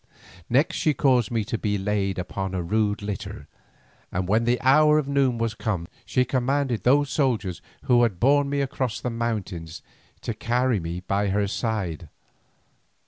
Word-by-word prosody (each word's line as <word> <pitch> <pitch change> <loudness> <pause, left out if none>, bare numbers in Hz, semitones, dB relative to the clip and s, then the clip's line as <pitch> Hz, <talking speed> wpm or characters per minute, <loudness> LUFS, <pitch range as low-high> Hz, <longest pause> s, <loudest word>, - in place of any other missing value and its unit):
Next 135 +6 +2
she 155 -2 +1
caused 125 -6 +3
me 115 -2 0
to 110 +2 -3
be 105 -2 0
laid 100 -1 -1
upon 95 +1 -4
my - - -1
rude 105 +4 0
litter, 100 -2 -6 0.6
and 90 0 -2
when 110 +4 +2
the 120 +1 +2
hour 150 +3 +5
of 150 -3 0
noon 135 -3 +2
was 115 -1 -1
come, 100 -7 -3 0.2
she 125 +6 +1
commanded 130 -1 0
those 140 +2 +3
soldiers 110 - 0 0.2
who 125 -3 +4
had 110 -7 +1
borne 140 +2 +3
me 140 0 0
across 130 -4 -2
the 125 - -3
mountains 100 -8 -4 0.4
to - - -3
carry 125 -1 0
me 85 +1 -5
by 100 +2 0
her 100 +1 +1
side. 95 - -3
115 Hz, 165 wpm, -25 LUFS, 100-130 Hz, 0.6 s, hour